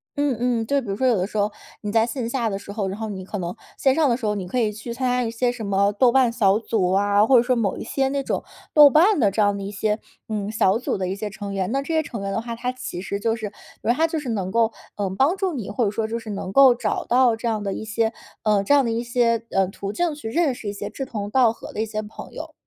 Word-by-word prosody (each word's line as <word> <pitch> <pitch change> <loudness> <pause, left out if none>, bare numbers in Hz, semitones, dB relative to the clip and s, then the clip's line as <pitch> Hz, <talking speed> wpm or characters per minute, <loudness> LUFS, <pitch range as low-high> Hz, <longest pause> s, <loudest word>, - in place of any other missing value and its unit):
嗯 285 -5 0
嗯， 240 -2 0
就 280 0 +2
比 240 - -8
如 195 - -1
说 260 +4 +1
有 235 -5 +3
的 180 - 0
时 210 +1 -3
候， 205 +1 +1 0.3
你 205 -1 -3
在 225 0 +4
线 235 -1 -3
下 240 -3 -1
的 195 -2 -2
时 200 - -9
候， 200 -2 -2
然 195 +3 -5
后 220 -1 -3
你 190 -2 -6
可 205 0 -5
能 175 0 -4 0.2
线 265 0 +3
上 315 -3 +3
的 - - +3
时 230 -4 -3
候 210 - 0
你 190 -3 -4
可 250 +7 -1
以 215 -2 +1
去 220 +3 -7
参 255 +1 -1
加 250 0 +1
一 225 - -2
些 240 +1 0
什 230 -4 -6
么 200 +1 +2
豆 240 +4 +4
瓣 255 -2 +4
小 210 -3 +3
组 200 -5 0
啊， 205 +2 +3
或 260 - +4
者 235 - +7
说 250 +1 +1
某 215 -5 0
一 - - -5
些 270 -1 0
那 280 0 -1
种 - - -2 0.3
豆 295 -2 +9
瓣 350 +3 +5
的 205 -5 +3
这 215 - 0
样 205 -1 +2
的 200 - -5
一 200 - -5
些， 210 +1 0 0.3
嗯， 210 -1 -2
小 215 -2 +3
组 240 - -2
的 185 - -1
一 190 - -2
些 210 0 -5
成 200 0 -6
员， 190 +2 -1
那 275 +1 +1
这 320 +3 -3
些 315 - +2
成 235 -8 -6
员 195 0 -3
的 210 - -1
话， 235 0 -5
他 250 +2 -2
其 255 -8 -6
实 200 +1 -3
就 225 +2 0
是， 220 -2 -4
因 205 +2 -9
为 - - +6
他 320 +5 +2
就 320 -1 -1
是 265 -4 -6
能 190 -4 -2
够， 230 0 +2 0.3
呃， 200 -2 -1
帮 290 +8 +3
助 385 -2 -1
你， 240 -10 -5
或 240 +3 0
者 200 - +2
说 215 +1 -2
就 230 +1 -3
是 225 - -10
能 195 -2 -4
够 265 -3 +7
找 - - -2
到 245 -2 +4
这 235 +1 -4
样 215 -2 -1
的 195 - -2
一 - - -5
些， 220 +1 0 0.3
呃， 210 -2 +3
这 200 - -2
样 280 -3 +6
的 230 - 0
一 230 +1 -1
些， 235 -1 +1
呃， 195 -1 +2
途 200 0 -5
径 345 +4 0
去 290 -7 -6
认 310 -1 +2
识 215 -4 -6
一 - - -4
些 205 0 -6
志 270 - -5
同 205 -4 -5
道 245 -3 +4
合 - - -10
的 215 - -2
一 225 - -1
些 215 0 -3
朋 210 - -10
友。 - - -7
225 Hz, 335 characters per minute, -23 LUFS, 205-250 Hz, 0.3 s, 豆